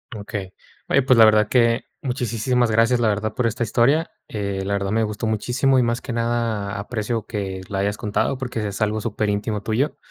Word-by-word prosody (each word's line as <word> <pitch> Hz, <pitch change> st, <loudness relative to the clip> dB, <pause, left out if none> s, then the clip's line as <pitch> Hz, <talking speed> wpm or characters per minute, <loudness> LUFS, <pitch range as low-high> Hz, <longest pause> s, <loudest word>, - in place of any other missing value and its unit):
Okey. 100 Hz, -2 st, -6 dB, 0.3 s
Oye, 140 Hz, -, +3 dB
pues, 130 Hz, -1 st, +4 dB
la 110 Hz, -, +10 dB
verdad 110 Hz, -1 st, +4 dB
que 115 Hz, -1 st, +3 dB, 0.2 s
muchisísimas 125 Hz, -2 st, 0 dB
gracias, 115 Hz, +2 st, +3 dB
la 115 Hz, -2 st, +3 dB
verdad, 105 Hz, +1 st, -2 dB
por 125 Hz, -, 0 dB
esta 115 Hz, +1 st, -2 dB
historia, 135 Hz, -, +2 dB, 0.2 s
eh, 100 Hz, -2 st, -3 dB
la 100 Hz, -, -1 dB
verdad, 100 Hz, -1 st, -1 dB
me 110 Hz, +1 st, +2 dB
gustó 105 Hz, +1 st, -3 dB
muchísimo, 125 Hz, +5 st, +1 dB
y 125 Hz, -, +4 dB
más 120 Hz, +1 st, -1 dB
que 130 Hz, -, -5 dB
nada 115 Hz, -4 st, -1 dB
aprecio 110 Hz, +1 st, -3 dB
que 95 Hz, -3 st, -4 dB
la 100 Hz, -, -2 dB
hayas 100 Hz, +1 st, 0 dB
contado 105 Hz, +4 st, 0 dB
porque 120 Hz, -5 st, -3 dB
es 100 Hz, 0 st, -6 dB
algo 110 Hz, 0 st, +1 dB
superíntimo 105 Hz, -1 st, -1 dB
tuyo. 115 Hz, +8 st, -1 dB
110 Hz, 195 wpm, -22 LUFS, 105-120 Hz, 0.3 s, la